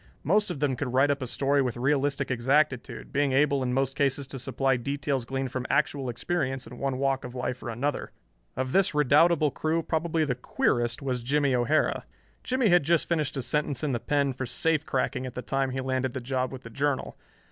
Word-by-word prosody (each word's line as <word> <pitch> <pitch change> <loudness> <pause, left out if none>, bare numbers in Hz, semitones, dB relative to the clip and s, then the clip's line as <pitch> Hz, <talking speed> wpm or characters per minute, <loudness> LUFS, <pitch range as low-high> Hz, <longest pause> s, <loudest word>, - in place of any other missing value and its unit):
Most 205 +7 +2
of 170 -6 -4
them 140 -2 +1
could 125 -1 -3
write 135 +3 +4
up 140 - -2
a 130 - -3
story 140 +3 +1
with 125 -3 -2
realistic 140 +1 0
exactitude, 130 +2 0
being 140 -1 +2
able 140 0 +3
in 125 -1 -1
most 135 +1 0
cases 140 -1 +1
to 135 0 -7
supply 130 +1 +1
details 140 0 -2
gleaned 135 0 -3
from 130 -1 -3
actual 140 -2 +1
experience 135 +1 -2
in 120 +1 -11
one 135 -2 -1
walk 135 0 0
of 125 0 -8
life 125 0 -3
or 120 - -5
another. 135 +6 -2 0.5
Of 130 0 -1
this 190 -3 +3
redoubtable 150 +2 +4
crew 160 +4 -1
probably 160 0 0
the 135 - 0
queerest 120 0 0
was 130 -3 -1
Jimmie 140 +2 +1
O'Hara. 125 +5 +1 0.4
Jimmie 255 -3 +1
had 175 -1 +6
just 165 +2 +2
finished 150 -4 -1
a 135 - -2
sentence 150 -1 0
in 150 - 0
the 120 - -1
"pen" 140 +1 0
for 130 0 -4
safe 160 +3 0
cracking 130 +1 -1
at 125 - -9
the 125 - -4
time 135 0 0
he 130 +1 -3
landed 130 -1 -1
the - - -1
job 130 +1 -2
with 130 -1 -8
the 115 - -10
Journal. 140 +2 -1
135 Hz, 210 wpm, -27 LUFS, 130-145 Hz, 0.5 s, had